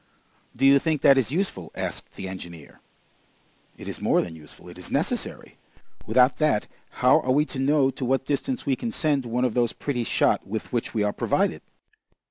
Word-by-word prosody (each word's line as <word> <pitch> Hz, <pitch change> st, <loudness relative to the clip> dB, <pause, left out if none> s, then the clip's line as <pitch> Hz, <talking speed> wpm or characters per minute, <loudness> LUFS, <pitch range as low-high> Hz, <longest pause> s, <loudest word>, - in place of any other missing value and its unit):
"Do 135 Hz, -, +1 dB
you 140 Hz, 0 st, +7 dB
think 155 Hz, -1 st, -1 dB
that 140 Hz, -1 st, +7 dB
is 125 Hz, -1 st, -1 dB
useful?" 155 Hz, -, -2 dB
asked -, -, -5 dB
the 95 Hz, -, -6 dB
engineer. 85 Hz, -5 st, -9 dB, 1.0 s
"It -, -, -10 dB
is -, -, -6 dB
more -, -, +3 dB
than 85 Hz, -2 st, -8 dB
useful, 75 Hz, -2 st, -14 dB
it -, -, -11 dB
is -, -, -9 dB
necessary! -, -, -3 dB, 0.5 s
Without 125 Hz, +3 st, +4 dB
that 150 Hz, -9 st, +2 dB, 0.4 s
how -, -, +7 dB
are 130 Hz, -, -1 dB
we 145 Hz, +3 st, +3 dB
to 135 Hz, -, -7 dB
know 135 Hz, 0 st, +3 dB
to 130 Hz, -, -7 dB
what 135 Hz, +1 st, 0 dB
distance 195 Hz, -, -2 dB
we 135 Hz, -, +2 dB
can 230 Hz, -, -4 dB
send 145 Hz, -, 0 dB
one 125 Hz, +2 st, 0 dB
of 125 Hz, -, 0 dB
those 120 Hz, -2 st, +1 dB
pretty 125 Hz, -5 st, -3 dB
shot 110 Hz, -, +1 dB
with 110 Hz, +4 st, -5 dB
which 120 Hz, -1 st, -2 dB
we 105 Hz, -, +2 dB
are 105 Hz, 0 st, 0 dB
provided?" -, -, 0 dB
130 Hz, 195 wpm, -25 LUFS, 110-145 Hz, 1.0 s, you